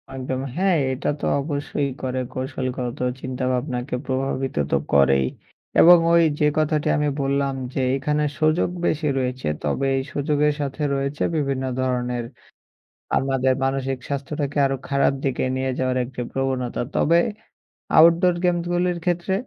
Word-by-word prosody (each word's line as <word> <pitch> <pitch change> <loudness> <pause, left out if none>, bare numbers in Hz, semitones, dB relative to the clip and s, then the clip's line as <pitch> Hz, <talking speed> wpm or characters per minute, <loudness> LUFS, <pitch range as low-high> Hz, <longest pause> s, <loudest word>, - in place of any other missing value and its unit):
একদম 130 0 -3 0.2
হ্যাঁ, 185 -1 +2 0.2
এটা 130 - -2
তো - - -3 0.2
অবশ্যই 145 -1 -2
করে 130 0 -2
কৌশলগত 130 -1 -4 0.2
চিন্তাভাবনাকে 125 0 -2
প্রভাবিত 135 0 -2 0.2
তো - - +4 0.2
করেই। 70 -1 +4 0.5
এবং 175 +1 +9 0.2
ওই 170 0 +6 0.2
যে 150 - +3
কথাটি 155 -1 +1
আমি 150 0 +1
বললাম 140 0 0 0.2
যে - - -1
এখানে 150 +2 0 0.2
সুযোগ 155 +2 +2 0.2
বেশি 155 0 0
রয়েছে। 130 0 -2 0.2
তবে 75 - 0
এই 135 - -1
সুযোগের 150 +1 +1
সাথে 140 +1 -4
রয়েছে 140 +2 -2
বিভিন্ন 135 -3 -1 0.2
ধরনের 125 -1 -1 0.9
আমাদের 135 -1 +2
মানসিক 135 0 -1
স্বাস্থ্যটাকে 145 +1 -3
আরো 135 0 -1
খারাপ 140 0 +2
দিকে 135 -2 0
নিয়ে 130 0 -1
যাওয়ার 130 0 0
একটি 125 0 -8
প্রবণতা। 130 -2 -2
তবে 170 +3 +4 0.8
আউটডোর 170 +2 +6
গেমসগুলির 175 0 +1
ক্ষেত্রে 175 +1 0
135 Hz, 135 wpm, -23 LUFS, 130-150 Hz, 0.9 s, এবং